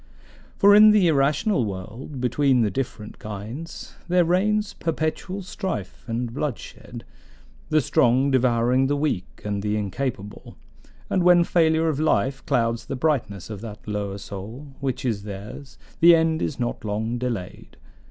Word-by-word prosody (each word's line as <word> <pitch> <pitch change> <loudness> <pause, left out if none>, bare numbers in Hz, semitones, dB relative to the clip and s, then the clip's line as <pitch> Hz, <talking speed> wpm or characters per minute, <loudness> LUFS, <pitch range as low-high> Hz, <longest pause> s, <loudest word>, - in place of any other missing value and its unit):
For 200 +1 +6
in 210 +1 +9
the 210 -4 +5
irrational 150 - +2
world, 110 +7 -6
between 125 +1 +2
the 105 -3 +1
different 110 -2 -5
kinds, 110 +11 -7
there 180 -1 +3
reigns 210 +4 +1
perpetual 165 +4 -3
strife 180 - -5
and 115 0 -3
bloodshed, 145 -3 -6 0.7
the 155 0 +3
strong 130 -1 +3
devouring 125 0 +2
the 145 - +1
weak 145 -11 -3
and 100 -1 -2
the 105 +1 -1
incapable; 105 0 -4 0.5
and 185 - +1
when 175 0 +6
failure 160 -1 +2
of 150 -3 0
life 135 -3 +1
clouds 115 -1 0
the - - -3
brightness 120 - -1
of 105 -2 -7
that 105 -2 -9
lower 100 -2 -3
soul, 105 +8 -8
which 135 -1 -3
is 110 -5 -1
theirs, 105 +7 -9 0.2
the 170 0 +8
end 160 0 +1
is 140 - -3
not 120 -3 -3
long 110 +3 -2
delayed. 115 -8 -5
130 Hz, 145 wpm, -24 LUFS, 105-160 Hz, 0.7 s, in